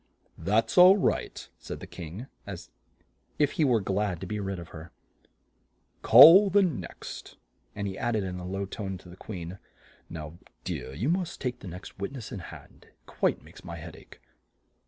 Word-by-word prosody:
"That's 115 Hz, -, +2 dB
all 185 Hz, +3 st, +9 dB
right," 195 Hz, -, -1 dB
said -, -, -7 dB
the -, -, -8 dB
King, 85 Hz, +9 st, -8 dB, 0.2 s
as -, -, -8 dB, 0.7 s
if 145 Hz, -2 st, +2 dB
he 160 Hz, -, 0 dB
were 125 Hz, -5 st, +3 dB
glad 95 Hz, -2 st, -1 dB
to -, -, -4 dB
be 105 Hz, +3 st, -4 dB
rid 95 Hz, -1 st, -3 dB
of 85 Hz, -1 st, -9 dB
her. 80 Hz, 0 st, -10 dB, 1.1 s
"Call 195 Hz, +5 st, +9 dB
the 200 Hz, +1 st, +4 dB
next," 150 Hz, -, -5 dB, 0.4 s
and 100 Hz, -, -3 dB
he 95 Hz, -, -6 dB
add 120 Hz, -1 st, 0 dB
ed 105 Hz, -, 0 dB
in 90 Hz, -1 st, -5 dB
a 90 Hz, -, -7 dB
low 95 Hz, +1 st, -3 dB
tone 95 Hz, -1 st, -5 dB
to 90 Hz, 0 st, -15 dB
the 90 Hz, -, -11 dB
Queen, 95 Hz, -2 st, -8 dB, 0.5 s
"Now, 75 Hz, -2 st, -7 dB
my 85 Hz, -, -16 dB, 0.3 s
dear, 65 Hz, -, -5 dB
you 105 Hz, -, -2 dB
must 175 Hz, +1 st, -1 dB
take 125 Hz, -2 st, -3 dB
the -, -, -10 dB
next 90 Hz, +2 st, -10 dB
wit 100 Hz, +7 st, -4 dB
ness 125 Hz, -5 st, -8 dB
in 100 Hz, -, -5 dB
hand; 85 Hz, -, -13 dB
it -, -, -32 dB
quite -, -, -1 dB
makes -, -, -15 dB
my -, -, -7 dB
head -, -, -9 dB
ache!" -, -, -16 dB
100 Hz, 195 wpm, -28 LUFS, 90-125 Hz, 1.1 s, all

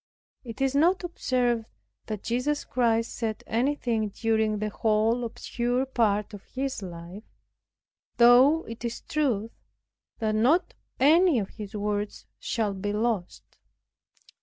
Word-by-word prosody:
It 235 Hz, +1 st, -8 dB
is 270 Hz, 0 st, +2 dB
not 345 Hz, +7 st, +3 dB
observed 250 Hz, -9 st, 0 dB, 0.4 s
that 215 Hz, -3 st, -5 dB
Jesus 250 Hz, +6 st, -1 dB
Christ 230 Hz, -2 st, +1 dB
said 220 Hz, -2 st, -3 dB
anything 235 Hz, -3 st, 0 dB
during 220 Hz, 0 st, 0 dB
the 215 Hz, 0 st, -3 dB
whole 220 Hz, +3 st, +1 dB
obscure 240 Hz, +2 st, -2 dB
part 215 Hz, -5 st, 0 dB
of 205 Hz, -, -9 dB
His 265 Hz, -3 st, -4 dB
life, 175 Hz, +3 st, -9 dB, 0.9 s
though 255 Hz, +7 st, +6 dB
it 230 Hz, +1 st, -9 dB
is 235 Hz, 0 st, -4 dB
true 235 Hz, -8 st, -1 dB, 0.7 s
that 220 Hz, -2 st, -1 dB
not 255 Hz, +12 st, +2 dB, 0.3 s
any 320 Hz, +2 st, +5 dB
of 200 Hz, -4 st, -2 dB
His 210 Hz, 0 st, -9 dB
words 205 Hz, 0 st, -3 dB
shall 215 Hz, -3 st, -1 dB
be 200 Hz, +2 st, -3 dB
lost. 210 Hz, -4 st, -2 dB
230 Hz, 125 wpm, -27 LUFS, 215-255 Hz, 0.9 s, though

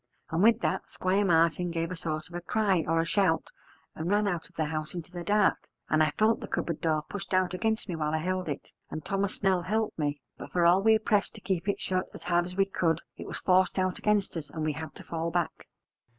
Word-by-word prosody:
And 160 Hz, +2 st, +1 dB
with 225 Hz, +2 st, +5 dB
that -, -, -1 dB
Squire 190 Hz, +2 st, +1 dB
Martin 170 Hz, -1 st, +3 dB
gave 165 Hz, 0 st, -2 dB
a -, -, -3 dB
sort 155 Hz, -2 st, -3 dB
of 170 Hz, -, -16 dB
a 175 Hz, -, -4 dB
cry 195 Hz, -2 st, +1 dB
or 165 Hz, +1 st, +2 dB
a 165 Hz, -, +2 dB
shout 170 Hz, -3 st, +1 dB, 0.4 s
and 160 Hz, +2 st, -4 dB
ran 205 Hz, +1 st, +3 dB
out 175 Hz, -4 st, -2 dB
of -, -, -28 dB
the 160 Hz, -, 0 dB
house 155 Hz, +1 st, -4 dB
into 175 Hz, 0 st, -6 dB
the 175 Hz, -1 st, -6 dB
dark, 205 Hz, +3 st, +2 dB, 0.2 s
and 155 Hz, -, +4 dB
I 155 Hz, -, +4 dB
felt 220 Hz, +1 st, +3 dB
the -, -, -7 dB
cupboard 170 Hz, -3 st, -2 dB
door 155 Hz, -2 st, +1 dB
pushed 200 Hz, -1 st, -3 dB
out 185 Hz, -1 st, +2 dB
against 220 Hz, +5 st, -1 dB
me 180 Hz, -, -3 dB
while 155 Hz, -1 st, -1 dB
I 160 Hz, -, +1 dB
held 185 Hz, +1 st, -2 dB
it, 145 Hz, -, -5 dB, 0.2 s
and 155 Hz, -, -6 dB
Thomas 195 Hz, 0 st, -1 dB
Snell 190 Hz, -3 st, +2 dB
helped 215 Hz, +2 st, -1 dB
me: 145 Hz, -1 st, -1 dB, 0.2 s
but -, -, -8 dB
for 175 Hz, -1 st, +2 dB
all 180 Hz, +3 st, +6 dB
we 220 Hz, +1 st, +5 dB
pressed 210 Hz, -3 st, +1 dB
to -, -, -11 dB
keep 185 Hz, 0 st, -1 dB
it 200 Hz, -, 0 dB
shut 185 Hz, 0 st, -1 dB
as -, -, -10 dB
hard 175 Hz, 0 st, +2 dB
as 180 Hz, +1 st, -7 dB
we 195 Hz, -, +4 dB
could, 170 Hz, -4 st, 0 dB, 0.2 s
it -, -, -7 dB
was -, -, -5 dB
forced 185 Hz, 0 st, +3 dB
out 185 Hz, -1 st, 0 dB
against 210 Hz, -3 st, +1 dB
us, 160 Hz, -3 st, -5 dB
and 160 Hz, -, -4 dB
we 155 Hz, -, 0 dB
had 155 Hz, -1 st, -7 dB
to -, -, -9 dB
fall 165 Hz, 0 st, -3 dB
back. 170 Hz, -1 st, -2 dB
175 Hz, 250 wpm, -29 LUFS, 160-195 Hz, 0.4 s, all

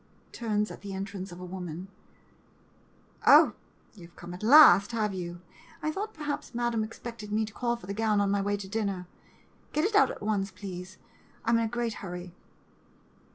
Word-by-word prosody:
[Turns 210 Hz, -3 st, -1 dB
at -, -, -11 dB
entrance 195 Hz, -1 st, -5 dB
of 175 Hz, -, -10 dB
woman.] 180 Hz, -1 st, -6 dB, 1.4 s
Oh, -, -, +8 dB, 0.4 s
you 180 Hz, -6 st, -12 dB
've 170 Hz, -, -26 dB
come 175 Hz, 0 st, -9 dB
at 180 Hz, -, -9 dB
last, 220 Hz, -, +8 dB
have 215 Hz, -3 st, 0 dB
you? 175 Hz, -1 st, -6 dB, 0.4 s
I 310 Hz, -, 0 dB
thought, 415 Hz, +6 st, -5 dB
perhaps, 295 Hz, -5 st, -4 dB
Madam 240 Hz, -2 st, 0 dB
expected 220 Hz, -1 st, -8 dB
me 220 Hz, +1 st, +1 dB
to 215 Hz, -, -11 dB
call 240 Hz, +1 st, -1 dB
for 235 Hz, -, -12 dB
the 200 Hz, -, -4 dB
gown 215 Hz, 0 st, +1 dB
on 200 Hz, -1 st, +2 dB
my 200 Hz, 0 st, +1 dB
way 205 Hz, +1 st, 0 dB
to 200 Hz, -1 st, -7 dB
dinner! 200 Hz, -3 st, -2 dB, 0.7 s
Get 305 Hz, +3 st, +2 dB
it 425 Hz, -, 0 dB
out 415 Hz, -, +6 dB
at -, -, -7 dB
once, 205 Hz, -2 st, 0 dB
please 185 Hz, -1 st, -8 dB, 0.2 s
— -, -, -28 dB
I 230 Hz, -, +2 dB
'm 230 Hz, -, +4 dB
in 230 Hz, -, +1 dB
a -, -, 0 dB
great 235 Hz, 0 st, -2 dB
hurry. 180 Hz, -2 st, -7 dB
205 Hz, 190 wpm, -29 LUFS, 185-230 Hz, 1.4 s, Oh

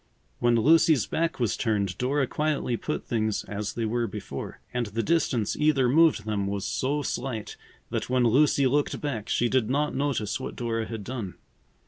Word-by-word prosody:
When 120 Hz, -1 st, +3 dB
Lucy's 155 Hz, -, +5 dB
back 165 Hz, -, -1 dB
was 120 Hz, -4 st, +1 dB
turned, 100 Hz, -5 st, 0 dB
Dora 135 Hz, +2 st, +1 dB
quietly 150 Hz, -3 st, -1 dB
put 150 Hz, +6 st, -4 dB
things 110 Hz, -2 st, -1 dB
as 105 Hz, 0 st, -4 dB
they 115 Hz, -, -2 dB
were 120 Hz, +1 st, 0 dB
before. 105 Hz, -2 st, -7 dB
And 120 Hz, -2 st, -1 dB
the 115 Hz, +3 st, -2 dB
distance 145 Hz, -10 st, +1 dB
either 150 Hz, -4 st, +3 dB
moved 150 Hz, -5 st, +4 dB
them 105 Hz, -2 st, -1 dB
was 100 Hz, -1 st, -3 dB
so 145 Hz, +3 st, -1 dB
slight 120 Hz, -5 st, -4 dB, 0.4 s
that -, -, -2 dB
when 125 Hz, -1 st, +2 dB
Lucy 140 Hz, +4 st, +4 dB
looked 145 Hz, +3 st, +1 dB
back 125 Hz, -8 st, -4 dB
she 120 Hz, -, +2 dB
did 120 Hz, -2 st, +1 dB
not 145 Hz, +3 st, +1 dB
notice 130 Hz, -7 st, -1 dB
what 130 Hz, -, -6 dB
Dora 115 Hz, -2 st, -2 dB
had 110 Hz, -3 st, -6 dB
done. 110 Hz, -5 st, -5 dB
120 Hz, 175 wpm, -27 LUFS, 110-145 Hz, 0.4 s, Lucy's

